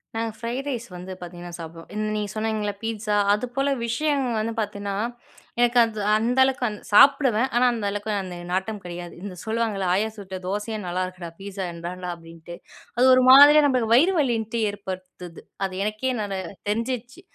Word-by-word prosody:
நாங்க 225 0 -1
fried 245 +4 -4
rice 235 -2 -4
வந்து 180 +2 -8
பார்த்திங்கன்னா 175 0 -9
சாப்பிடுவோம். 165 0 -9 0.3
நீங்க 210 -1 -2
சொன்னிங்கல்ல 215 -1 -2
பீட்ஸா 220 -2 -2 0.2
அது 210 +5 -1
போல 275 +1 +1 0.2
விஷயம் 275 +3 0
வந்து 225 +1 -2
பார்த்திங்கன்னா, 200 -2 -3 0.6
எனக்கு 240 0 +3
அது 225 -2 -3 0.2
அந்த 235 +4 +1
அளவுக்கு 260 -2 +1 0.2
சாப்பிடுவேன் 260 0 +5
ஆனா 245 +1 +4
அந்த 225 -3 -3
அளவுக்கு 205 +1 -3
அந்த 180 -1 -7 0.2
நாட்டம் 195 +3 -2
கிடையாது. 175 0 -7
இந்த 195 -3 -6
சொல்லுவாங்கல்ல 220 -3 -1
"ஆயா 210 +4 +1
சுட்ட 190 -2 -7
தோசையே 210 +3 -3
நல்லாயிருக்குடா! 180 -1 -4
பீஸா 195 0 -6
என்னடா" 180 +2 -6
அப்படின்ட்டு 165 0 -12 0.4
அது 250 - +5
ஒரு 255 0 +5
மாதிரியா 290 +3 +9
நம்மளுக்கு 245 -5 +2
வயிறு 340 +9 +5
வலின்னுட்டு 230 -4 0
ஏற்படுத்துது. 185 -3 -9 0.2
அது 190 - -5
எனக்கே 215 +5 -1
நல் 200 -2 -3 0.3
தெரிஞ்சிடுச்சு 245 +6 -3
215 Hz, 155 wpm, -24 LUFS, 185-240 Hz, 0.6 s, மாதிரியா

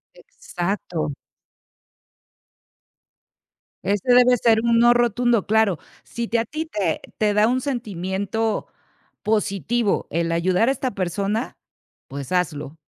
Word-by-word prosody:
Exacto. 175 - -4 2.7
Ese 205 +6 +1
debe 250 0 +6
ser 225 -1 +3
un 235 -1 +3
no 240 +1 +6
rotundo. 240 -2 +2
Claro, 215 -4 +2 0.3
si 235 0 -4
te 235 - +2
a 225 - -1
ti 310 +5 -4
te 200 - -2 0.2
te 210 -1 +2
da 210 +1 +4
un 255 +1 +1
sentimiento 210 -3 -2 0.6
positivo 215 +1 0
el 165 +1 -1
ayudar 180 +7 +2
a - - +4
esta 265 -2 -2
persona, 200 +5 -2 0.5
pues, 140 +2 -7
hazlo. 155 -4 -2
210 Hz, 115 wpm, -22 LUFS, 185-240 Hz, 2.7 s, debe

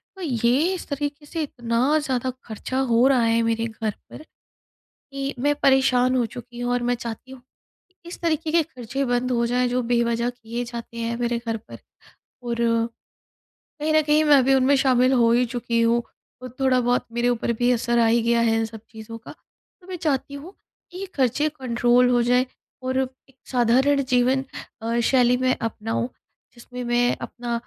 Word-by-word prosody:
तो 380 - -11
ये 265 +5 +1
इस 365 - -6
तरीके 290 +1 -4
से 325 +2 -4
इतना 245 +3 0
ज़्यादा 260 -3 -2 0.2
खर्चा 235 +4 -4
हो 235 +3 +4
रहा 265 -3 +3
है 230 0 +2
मेरे 230 0 0
घर 220 -1 -3 0.2
पर, - - -10 0.7
कि 275 0 -6
मैं 290 +3 +2
परेशान 260 -1 +4
हो 245 - +2
चुकी 245 0 -10
हूँ 245 0 -1
और 245 0 0
मैं 245 0 +1
चाहती 235 +2 -7
हूँ, 265 - -10
कि 365 +8 -47
इस - - -9
तरीके 320 -1 -1
के 335 -1 +3
खर्चे 260 -3 -5
बंद 245 +1 0
हो 235 -1 +1
जाएँ 250 +1 +1
जो 250 +1 0
बेवजह 235 0 +1
किए 240 0 -6
जाते 235 -1 -8
हैं 230 0 -2
मेरे 240 -1 0
घर 225 0 -1
पर। 215 - -13 0.6
और, 235 -1 -2 1.3
कहीं 310 +1 0
न 310 - +5
कहीं 300 +1 +3
मैं 290 -3 +6
भी 270 +1 +4
उनमें 270 +1 +4
शामिल 255 -1 +3
हो 235 -2 +4
ही 245 +1 +3
चुकी 235 -1 -2
हूँ 235 +1 +2 0.4
और 255 -1 -9
थोड़ा 260 -1 +3
बहुत 245 +1 0
मेरे 240 +1 0
ऊपर 235 -1 0
भी 245 0 +2
असर 240 0 0
आ 230 - +4
ही 230 +1 +3
गया 235 0 +2
है 225 -1 +2
इन 225 - 0
सब 220 -1 -10
चीज़ों 225 +1 -9
का। 220 - -11 0.5
तो 360 - -19
मैं 370 - -4
चाहती 285 -3 -2
हूँ 310 +7 -9 0.4
कि 360 - -9
ये 390 - -5
खर्चे 275 +3 +1
कंट्रोल 245 0 +3
हो 245 -1 +3
जाएँ 250 +2 +2 0.4
और 260 0 -1
एक 265 0 -5 0.2
साधारण 260 +4 +3
जीवन 255 +1 +2 0.4
अ, 230 +1 0
शैली 250 0 +3
में 255 0 +1
अपनाऊँ 225 +1 -2 0.5
जिसमें 250 +1 -8
मैं 240 0 +1
अपना 240 -1 -4
245 Hz, 190 wpm, -23 LUFS, 235-270 Hz, 1.3 s, मैं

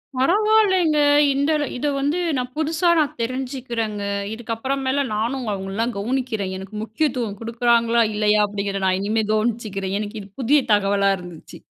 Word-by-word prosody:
பரவால்லைங்க. 375 +1 +3 0.4
இந்த 280 +3 0 0.3
இதை 290 +3 -1
வந்து 290 +6 0 0.2
நான் 250 0 -3
புதுசா 320 +3 +1
நான் 295 -4 0
தெரிஞ்சிக்கிறேங்க. 240 -4 -3 0.3
இதுக்கப்புறமேல 260 +4 -2
நானும் 240 +3 -2
அவங்கள்லாம் 200 +5 -3
கவனிக்கிறேன் 220 -4 -2
எனக்கு 190 +2 -9
முக்கியத்துவம் 230 -3 -2
கொடுக்குறாங்களா? 235 0 +2
இல்லையா? 210 0 +2
அப்படிங்கிறத 200 -1 -3
நான் 185 0 +2
இனிமே 215 +2 0
கவனிச்சிக்கிறேன். 215 -4 -1
எனக்கு 210 +1 -5
இது 200 - -12
புதிய 280 +4 +4
தகவலா 200 -1 +2
இருந்துச்சி. 175 -3 -11
230 Hz, 130 wpm, -22 LUFS, 205-270 Hz, 0.4 s, புதிய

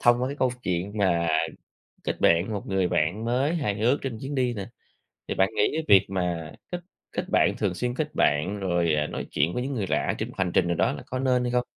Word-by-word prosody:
Thông 120 +1 +4
qua 130 - +1
cái 140 - -5
câu 130 - +2
chuyện 90 +2 -2
mà 85 -4 +2 0.8
kết - - -3
bạn 85 0 +5
với 110 - -4
một 100 - -5
người 95 -2 +1
bạn 90 +10 0
mới 130 +7 +1
hài 125 -11 -1
hước 125 +6 +3
trên 130 -4 -4
chuyến 140 +1 -4
đi 125 -2 +1
nè, 100 -3 -5 0.6
thì - - -2
bạn 95 0 +3
nghĩ - - +3
cái 160 0 -1
việc 100 -2 +7
mà 90 -4 -2 0.2
kết 175 - -3 0.3
kết - - -2
bạn, - - +3
thường 95 -3 0
xuyên 120 +6 -2
kết 150 0 -3
bạn 90 +8 +2
rồi, 85 -4 +1
ờ, 75 0 +1
nói - - -5
chuyện 80 +5 +1
với 125 - -1
những 140 +1 -3
người 105 -6 -2
lạ - - 0
trên - - -3
một - - -12
hành 95 -2 0
trình 90 - +3
nào 85 - +1
đó - - +2
là - - -8
có 130 - -3
nên 125 -2 +2
hay 125 - -1
không? 125 0 +1
100 Hz, 260 wpm, -26 LUFS, 90-125 Hz, 0.8 s, việc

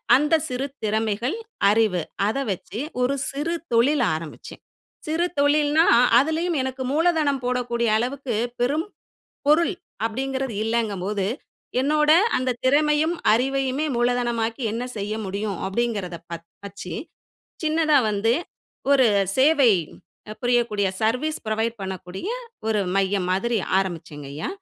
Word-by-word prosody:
அந்த 300 +4 +3
சிறு 255 +2 -2 0.2
திறமைகள், 220 - 0 0.3
அறிவு 210 -4 +2 0.3
அத 220 - -1
வச்சு 195 +3 -6 0.2
ஒரு 265 +3 +1
சிறு 295 +5 -2 0.2
தொழில் 255 +4 +4
ஆரம்பிச்சேன். 160 -1 -9 0.5
சிறு 320 +3 +1
தொழில்னா 295 +2 +4 0.3
அதுலயும் 320 +3 0
எனக்கு 260 0 -4
மூலதனம் 310 -4 +2
போடக்கூடிய 240 -2 0
அளவுக்கு 255 +2 -2 0.3
பெரும் 290 +7 +1 0.6
பொருள் 335 +5 +4 0.3
அப்டிங்கறது 265 +1 -3
இல்லைங்கும்போது, 210 -4 -1 0.5
என்னோட 300 +2 +2 0.3
அந்த 255 0 0
திறமையும் 300 +4 +3 0.2
அறிவையுமே 270 +4 +1
மூலதனமாக்கி 240 -1 0
என்ன 230 +2 -3 0.2
செய்ய 205 +1 -3
முடியும் 200 +1 -3
அப்டிங்கறத 200 -4 -2
பர்த்த 170 0 -7 0.2
வச்சு 195 -2 -8 0.7
சின்னதா 310 -1 +3
வந்து 210 +2 +1 0.6
ஒரு 270 -3 +6 0.3
சேவை 275 -2 +5 0.7
புரியக்கூடிய 235 -5 +2
சர்வீஸ் 255 +8 0
ப்ரொவைட் 220 +1 -1
பண்ணக்கூடிய 190 - -6 0.4
ஒரு 215 -2 +2 0.2
மையம் 195 -1 +1
மாதிரி 225 +5 +1 0.2
ஆரம்பிச்சேங்கயா. 155 -6 -4
240 Hz, 105 wpm, -23 LUFS, 210-285 Hz, 0.7 s, ஒரு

